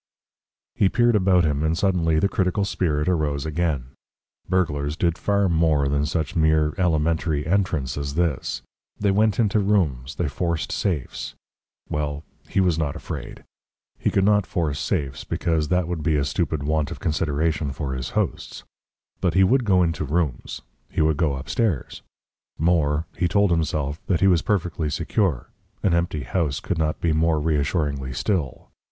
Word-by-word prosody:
He 95 Hz, -, +3 dB
peered 120 Hz, +1 st, +3 dB
about 95 Hz, -3 st, +4 dB
him, 75 Hz, -2 st, 0 dB
and 80 Hz, +1 st, +1 dB
suddenly 85 Hz, -5 st, +2 dB
the 90 Hz, -, +3 dB
critical 95 Hz, +1 st, 0 dB
spirit 75 Hz, -6 st, 0 dB
arose 75 Hz, -5 st, 0 dB
again. 80 Hz, -5 st, -1 dB, 0.6 s
Burglars 75 Hz, -5 st, 0 dB
did 85 Hz, -2 st, +1 dB
far 100 Hz, +1 st, +1 dB
more 80 Hz, -4 st, +2 dB
than 70 Hz, +1 st, 0 dB
such 80 Hz, -1 st, -2 dB
mere 80 Hz, -1 st, +3 dB
elementary 80 Hz, -3 st, +1 dB
entrance 80 Hz, -8 st, 0 dB
as 70 Hz, 0 st, -4 dB
this: 85 Hz, -5 st, -1 dB, 0.4 s
they 100 Hz, -1 st, +2 dB
went 105 Hz, +1 st, +2 dB
into 105 Hz, -2 st, +3 dB
rooms, 80 Hz, -10 st, 0 dB
they 85 Hz, -, -1 dB
forced 85 Hz, +3 st, -2 dB
safes. 85 Hz, -10 st, -3 dB, 0.5 s
Well 75 Hz, 0 st, -3 dB, 0.3 s
he -, -, 0 dB
was 90 Hz, -4 st, +2 dB
not 75 Hz, -3 st, -1 dB
afraid. -, -, -7 dB, 0.6 s
He -, -, +1 dB
could 95 Hz, -, +2 dB
not 105 Hz, -1 st, +3 dB
force 75 Hz, -5 st, -1 dB
safes, 65 Hz, -2 st, -2 dB
because 80 Hz, -3 st, -1 dB
that 90 Hz, +1 st, +1 dB
would 85 Hz, -2 st, -3 dB
be 75 Hz, +1 st, +1 dB
a 70 Hz, -2 st, +1 dB
stupid 70 Hz, +1 st, -1 dB
want 75 Hz, -1 st, 0 dB
of -, -, -7 dB
consideration 80 Hz, -1 st, 0 dB
for 70 Hz, -1 st, -4 dB
his 65 Hz, -1 st, -4 dB
hosts. -, -, -2 dB, 0.6 s
But 90 Hz, -2 st, 0 dB
he 95 Hz, -, +6 dB
would 125 Hz, +6 st, +3 dB
go 95 Hz, -3 st, +4 dB
into 80 Hz, -2 st, -1 dB
rooms 75 Hz, -2 st, -2 dB, 0.3 s
he -, -, -1 dB
would 80 Hz, -1 st, +2 dB
go 75 Hz, -4 st, +1 dB
upstairs. 80 Hz, -, -2 dB, 0.6 s
More: 80 Hz, -2 st, +2 dB
he 90 Hz, 0 st, +1 dB
told 100 Hz, +1 st, +2 dB
himself 75 Hz, -3 st, -1 dB
that 85 Hz, -4 st, +1 dB
he 95 Hz, -, +5 dB
was 90 Hz, -3 st, +4 dB
perfectly 90 Hz, -6 st, -1 dB
secure; 80 Hz, -, -1 dB, 0.3 s
an 95 Hz, -, +3 dB
empty 85 Hz, -4 st, 0 dB
house 75 Hz, +1 st, -1 dB
could 90 Hz, -4 st, -3 dB
not 75 Hz, -1 st, 0 dB
be 85 Hz, -2 st, +2 dB
more 80 Hz, 0 st, +2 dB
reassuringly 75 Hz, -3 st, -1 dB
still. 75 Hz, -, -2 dB
80 Hz, 165 wpm, -23 LUFS, 75-90 Hz, 0.6 s, he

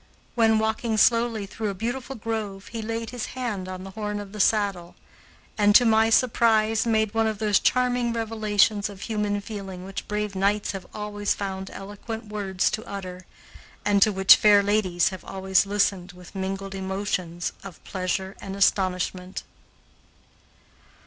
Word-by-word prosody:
When 225 Hz, -2 st, +4 dB
walking 220 Hz, +1 st, 0 dB
slowly 230 Hz, -1 st, +3 dB
through 210 Hz, +2 st, -4 dB
a 200 Hz, -, -4 dB
beautiful 245 Hz, +6 st, -4 dB
grove, 210 Hz, -3 st, -4 dB
he 230 Hz, -1 st, -5 dB
laid 225 Hz, +1 st, -4 dB
his 245 Hz, -3 st, -4 dB
hand 210 Hz, -7 st, -3 dB
on 185 Hz, 0 st, -6 dB
the 195 Hz, -, -8 dB
horn 210 Hz, 0 st, -4 dB
of 205 Hz, -1 st, -8 dB
the 210 Hz, -, -8 dB
saddle 195 Hz, -4 st, +1 dB, 0.6 s
and, 205 Hz, 0 st, +4 dB
to 245 Hz, -, +8 dB
my 220 Hz, 0 st, +4 dB
surprise, 225 Hz, -2 st, +3 dB
made 220 Hz, -2 st, +1 dB
one 225 Hz, 0 st, +2 dB
of 215 Hz, -1 st, -2 dB
those 210 Hz, -1 st, +2 dB
charming 245 Hz, -1 st, +1 dB
revelations 215 Hz, -2 st, +1 dB
of 195 Hz, -2 st, -11 dB
human 210 Hz, -2 st, -1 dB
feeling 195 Hz, -4 st, -7 dB
which 195 Hz, 0 st, -6 dB
brave 210 Hz, -1 st, -2 dB
knights 200 Hz, +2 st, +1 dB
have 195 Hz, -2 st, -7 dB
always 205 Hz, -1 st, -2 dB
found 190 Hz, -1 st, -5 dB
eloquent 210 Hz, +3 st, -8 dB
words 195 Hz, -3 st, -1 dB
to 220 Hz, +2 st, -4 dB
utter, 185 Hz, -2 st, -7 dB, 0.6 s
and 205 Hz, -1 st, +3 dB
to 215 Hz, -, +6 dB
which 190 Hz, -1 st, +7 dB
fair 205 Hz, -1 st, +6 dB
ladies 200 Hz, -4 st, +2 dB
have 185 Hz, -1 st, -9 dB
always 190 Hz, +1 st, +1 dB
listened 195 Hz, -3 st, 0 dB
with 180 Hz, -1 st, -14 dB
mingled 195 Hz, 0 st, -4 dB
emotions 190 Hz, -3 st, -3 dB
of 195 Hz, -3 st, -9 dB
pleasure 190 Hz, 0 st, -3 dB
and 195 Hz, -1 st, -6 dB
astonishment. 185 Hz, -1 st, 0 dB
205 Hz, 155 wpm, -25 LUFS, 190-220 Hz, 0.6 s, to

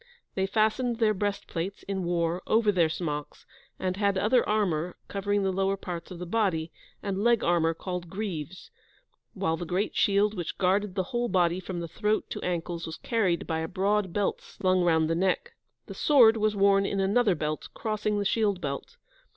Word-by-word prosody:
They 190 Hz, 0 st, 0 dB
fastened 220 Hz, +4 st, +1 dB
their 220 Hz, -2 st, +3 dB
breastplates, 195 Hz, -2 st, -3 dB
in 195 Hz, -1 st, -3 dB
war, 170 Hz, 0 st, 0 dB
over 220 Hz, -1 st, +3 dB
their 170 Hz, -5 st, +3 dB
smocks, 150 Hz, -3 st, -4 dB, 0.3 s
and 185 Hz, 0 st, -2 dB
had 200 Hz, -1 st, +1 dB
other 230 Hz, +6 st, +3 dB
armour 180 Hz, -6 st, 0 dB
covering 205 Hz, 0 st, -1 dB
the 190 Hz, -, +1 dB
lower 195 Hz, +1 st, +1 dB
parts 175 Hz, -3 st, -6 dB
of 180 Hz, -, -8 dB
the 180 Hz, -, -6 dB
body, 175 Hz, -5 st, 0 dB, 0.3 s
and 200 Hz, 0 st, -2 dB
leg 235 Hz, -1 st, +3 dB
armour 165 Hz, -1 st, +2 dB
called 180 Hz, -1 st, -5 dB
"greaves"; 185 Hz, -4 st, -5 dB, 0.6 s
while 165 Hz, -5 st, 0 dB
the 175 Hz, -, -5 dB
great 185 Hz, +5 st, -1 dB
shield 205 Hz, +1 st, +3 dB
which 175 Hz, -5 st, -5 dB
guarded 195 Hz, +1 st, +1 dB
the 190 Hz, -, +1 dB
whole 240 Hz, 0 st, 0 dB
body 180 Hz, -1 st, +2 dB
from 175 Hz, -2 st, -5 dB
throat 210 Hz, +6 st, -1 dB
to -, -, -4 dB
ankles 170 Hz, -1 st, -3 dB
was 160 Hz, -, -6 dB
carried 200 Hz, -8 st, 0 dB
by 160 Hz, 0 st, -2 dB
a 160 Hz, -, -2 dB
broad 200 Hz, +1 st, 0 dB
belt 205 Hz, +2 st, -1 dB
slung 185 Hz, -1 st, 0 dB
round 160 Hz, -2 st, +3 dB
the 165 Hz, -, +1 dB
neck. 190 Hz, -, 0 dB, 0.3 s
The -, -, -8 dB
sword 245 Hz, -7 st, +6 dB
was 215 Hz, -1 st, +1 dB
worn 195 Hz, 0 st, +4 dB
in 195 Hz, 0 st, -1 dB
another 200 Hz, +1 st, +3 dB
belt, 150 Hz, 0 st, -3 dB
crossing 215 Hz, -1 st, -1 dB
the 205 Hz, -, -1 dB
shield 205 Hz, -2 st, +1 dB
belt. 140 Hz, -5 st, -5 dB
190 Hz, 185 wpm, -28 LUFS, 175-210 Hz, 0.6 s, sword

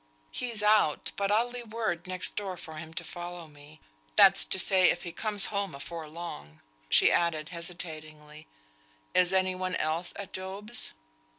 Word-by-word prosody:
"He's 235 Hz, -4 st, -3 dB
out, 210 Hz, -8 st, +3 dB
but 200 Hz, 0 st, -1 dB
I'll 230 Hz, +3 st, +2 dB
leave 240 Hz, -2 st, -8 dB
word 185 Hz, -6 st, -2 dB
next 185 Hz, 0 st, +2 dB
door 195 Hz, -3 st, -4 dB
for 160 Hz, -2 st, -9 dB
him 160 Hz, 0 st, -8 dB
to -, -, -4 dB
follow 175 Hz, -1 st, -8 dB
me; 150 Hz, +1 st, -16 dB, 0.4 s
that's -, -, +8 dB
to -, -, -1 dB
say, 185 Hz, -1 st, +5 dB
if 175 Hz, -, -1 dB
he 175 Hz, -, -5 dB
comes 210 Hz, +3 st, +2 dB
home 200 Hz, -5 st, -2 dB
afore 155 Hz, +3 st, -7 dB
long." 115 Hz, -, -8 dB, 0.3 s
She -, -, +6 dB
added, 160 Hz, -3 st, +1 dB
hesitatingly, 155 Hz, -3 st, -7 dB, 0.7 s
"Is 180 Hz, 0 st, +4 dB
any 185 Hz, -1 st, +2 dB
one 185 Hz, 0 st, -3 dB
else 160 Hz, +3 st, -1 dB
at 200 Hz, -, -8 dB
Job's?" 200 Hz, +5 st, -6 dB
175 Hz, 165 wpm, -29 LUFS, 160-200 Hz, 0.7 s, that's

